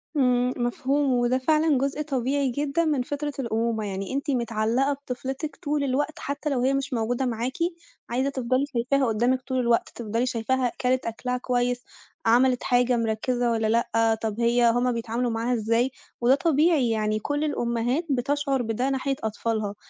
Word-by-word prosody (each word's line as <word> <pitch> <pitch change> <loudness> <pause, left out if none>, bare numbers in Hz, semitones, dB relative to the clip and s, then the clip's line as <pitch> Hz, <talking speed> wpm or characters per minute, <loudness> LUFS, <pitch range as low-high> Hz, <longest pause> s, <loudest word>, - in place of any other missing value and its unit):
امم، 250 -2 +2
مفهوم 265 +3 0
وده 245 +1 +2
فعلًا 305 +2 +2
جزء 275 +3 -1
طبيعي 275 -1 0
جدًا 290 +5 0
من 295 -5 +1
فطرة 290 +3 -3
الأمومة، 230 -2 -1
يعني 195 +2 -4
أنتِ 280 +1 -1
متعلقة 235 +2 +1
بطفلتِك 270 +2 -5
طول 295 0 -2
الوقت 280 +3 -1
حتّى 285 +2 -3
لو 265 -4 0
هي 265 +2 +2
مش 275 0 -2
موجودة 240 +3 0
معاكِ، 245 +3 -2 0.5
عايزة 260 +3 0
تفضلي 260 0 0
شايفاها 260 +3 +1
قدامِك 240 +4 +1
طول 260 0 -2
الوقت 235 -2 +2
تفضلي 230 +1 -1
شايفاها 250 +1 0
كلِت 255 +1 +1
أكلها 250 +2 -2
كويّس، 245 0 -1 0.4
عملِت 250 +2 +4
حاجة 245 0 +2
مركّزة 235 +2 0
والّا 225 -1 +1
لأ 225 0 +2
طَب 220 0 -3
هي 235 0 +4
هُم 245 +2 +2
بيتعاملوا 235 +1 -2
معاها 230 +2 -1
إزاي، 230 +3 +1 0.3
وده 245 +3 +5
طبيعي 305 -4 +3
يعني 215 -1 0
كل 290 +6 -2
الأمهات 240 +1 0
بتشعر 275 +1 0
بده 240 +3 -1
ناحية 270 0 -1
أطفالها، 220 -1 -2
250 Hz, 160 wpm, -25 LUFS, 235-275 Hz, 0.5 s, وده